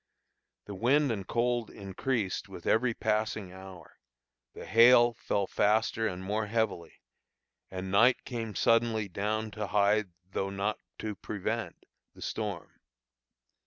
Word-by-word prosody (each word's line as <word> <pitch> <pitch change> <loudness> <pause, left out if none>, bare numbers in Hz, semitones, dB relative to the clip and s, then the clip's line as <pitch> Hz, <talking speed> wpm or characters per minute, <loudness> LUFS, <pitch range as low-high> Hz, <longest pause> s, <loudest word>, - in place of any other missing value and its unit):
The 105 - -7
wind 130 +7 +2
and 100 -4 -4
cold 120 -1 0
increased 100 +1 -3
with - - -10
every 115 +1 +2
passing 110 -3 -1
hour, 95 -2 -12 0.6
the - - -8
hail 120 +1 +6
fell 100 -3 -1
faster 110 +3 +1
and 90 -1 -5
more 105 +2 -1
heavily, 105 - -2 0.7
and 95 0 -5
night 115 +6 +4
came 115 -5 -5
suddenly 115 +1 +2
down 105 +3 -2
to 105 -1 -4
hide, 100 +1 +2 0.2
though 95 +1 -2
not 100 +2 -2 0.2
to 110 -1 -4
prevent, 110 +4 -4 0.3
the - - -15
storm. 105 -6 -5
110 Hz, 125 wpm, -30 LUFS, 100-115 Hz, 0.7 s, hail